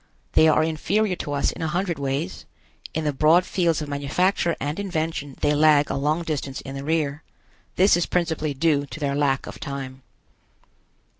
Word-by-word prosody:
They 160 Hz, -, +6 dB
are 155 Hz, -, +4 dB
inferior 180 Hz, +6 st, 0 dB
to 145 Hz, -, -4 dB
us 140 Hz, -, +1 dB
in -, -, -9 dB
a 160 Hz, -, 0 dB
hundred 175 Hz, -1 st, -1 dB
ways. 140 Hz, +6 st, -3 dB, 0.5 s
In 160 Hz, -, -1 dB
the 150 Hz, -1 st, 0 dB
broad 160 Hz, +6 st, +4 dB
fields 170 Hz, -5 st, 0 dB
of -, -, -6 dB
manufacture 165 Hz, +5 st, 0 dB
and 145 Hz, +6 st, -3 dB
invention 160 Hz, -7 st, -3 dB
they 145 Hz, -, +3 dB
lag 150 Hz, -1 st, +4 dB
a -, -, -1 dB
long 150 Hz, +5 st, 0 dB
distance 140 Hz, -4 st, -3 dB
in 135 Hz, -, -8 dB
the 135 Hz, 0 st, -6 dB
rear. 150 Hz, -1 st, -1 dB, 0.5 s
This 190 Hz, +1 st, +5 dB
is 175 Hz, -, 0 dB
principally 160 Hz, -4 st, -1 dB
due 145 Hz, -1 st, +1 dB
to 160 Hz, -, -8 dB
their 140 Hz, -2 st, -1 dB
lack 140 Hz, -2 st, +1 dB
of -, -, -9 dB
time. 135 Hz, -2 st, -6 dB
155 Hz, 180 wpm, -24 LUFS, 140-165 Hz, 0.5 s, They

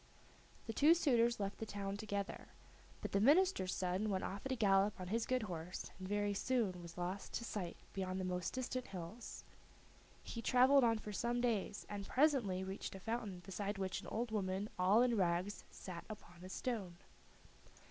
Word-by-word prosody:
The 225 Hz, -, -3 dB
two 305 Hz, +8 st, +6 dB
suitors 240 Hz, -8 st, +3 dB
left 200 Hz, 0 st, -3 dB
the 225 Hz, -, -3 dB
town 200 Hz, -1 st, -3 dB
together, 205 Hz, -1 st, -3 dB, 0.5 s
but -, -, -4 dB
the 200 Hz, -, +2 dB
minister's 290 Hz, -, +5 dB
son 185 Hz, +3 st, 0 dB
went 190 Hz, -2 st, 0 dB
off 195 Hz, +1 st, -4 dB
at -, -, -4 dB
a -, -, +2 dB
gallop 200 Hz, -2 st, +3 dB
on 180 Hz, -1 st, -5 dB
his 225 Hz, +2 st, 0 dB
good 255 Hz, -2 st, +1 dB
horse, 175 Hz, -2 st, -5 dB
and 185 Hz, -, -5 dB
very 205 Hz, 0 st, +1 dB
soon 200 Hz, -5 st, 0 dB
was 170 Hz, 0 st, -10 dB
lost 180 Hz, +3 st, -3 dB
to -, -, -2 dB
sight 195 Hz, -7 st, -4 dB, 0.2 s
behind 190 Hz, -1 st, -2 dB
the -, -, -1 dB
most 180 Hz, -1 st, -1 dB
distant 255 Hz, 0 st, -2 dB
hills. 190 Hz, +5 st, -7 dB, 0.8 s
He 230 Hz, -, -5 dB
traveled 255 Hz, +3 st, +6 dB
on 230 Hz, -1 st, +4 dB
for 210 Hz, -1 st, -6 dB
some 240 Hz, +4 st, 0 dB
days, 225 Hz, -4 st, 0 dB
and 200 Hz, -1 st, -5 dB
presently 250 Hz, -10 st, +3 dB
reached 190 Hz, +1 st, -5 dB
a -, -, -7 dB
fountain 215 Hz, -3 st, -3 dB
beside 200 Hz, +1 st, -3 dB
which 190 Hz, -1 st, -2 dB
an -, -, -10 dB
old 230 Hz, +1 st, -2 dB
woman 195 Hz, 0 st, -1 dB
all 200 Hz, +6 st, +6 dB
in 245 Hz, -2 st, +3 dB
rags 185 Hz, +1 st, 0 dB
sat 175 Hz, -3 st, -7 dB
upon 180 Hz, -4 st, -10 dB
a 185 Hz, -, -8 dB
stone. 195 Hz, -6 st, -3 dB
205 Hz, 185 wpm, -38 LUFS, 185-235 Hz, 0.8 s, two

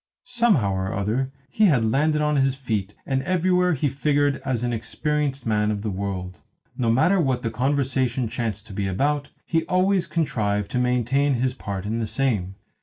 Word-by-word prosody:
Somehow 235 Hz, -, +2 dB
or 95 Hz, 0 st, -2 dB
other 115 Hz, +7 st, -1 dB, 0.2 s
he 215 Hz, +10 st, +2 dB
had 130 Hz, -10 st, +3 dB
landed 150 Hz, +4 st, +2 dB
on 150 Hz, -1 st, +2 dB
his 135 Hz, -1 st, +2 dB
feet, 110 Hz, -7 st, -3 dB
and 135 Hz, -1 st, 0 dB
everywhere 180 Hz, +3 st, +2 dB
he 145 Hz, 0 st, 0 dB
figured 145 Hz, +1 st, +1 dB
as 125 Hz, -3 st, -1 dB
an 120 Hz, -1 st, 0 dB
experienced 140 Hz, +3 st, -2 dB
man 105 Hz, -1 st, +1 dB
of 105 Hz, -1 st, -2 dB
the 110 Hz, -, -2 dB
world. 95 Hz, -2 st, -4 dB, 0.3 s
No 120 Hz, -2 st, 0 dB
matter 160 Hz, +11 st, +3 dB
what 130 Hz, -5 st, 0 dB
the 115 Hz, -, -1 dB
conversation 130 Hz, -1 st, 0 dB
chanced 110 Hz, -3 st, -3 dB
to 110 Hz, -, -10 dB
be 100 Hz, 0 st, -2 dB
about, 145 Hz, +9 st, 0 dB, 0.2 s
he 165 Hz, -1 st, +1 dB
always 185 Hz, 0 st, +2 dB
contrived 105 Hz, -11 st, -1 dB
to 125 Hz, -, 0 dB
maintain 125 Hz, +3 st, +2 dB
his 125 Hz, +1 st, 0 dB
part 100 Hz, -6 st, -5 dB
in 110 Hz, +3 st, -2 dB
the 110 Hz, -, -1 dB
same. 105 Hz, -8 st, -1 dB
130 Hz, 180 wpm, -24 LUFS, 110-145 Hz, 0.3 s, had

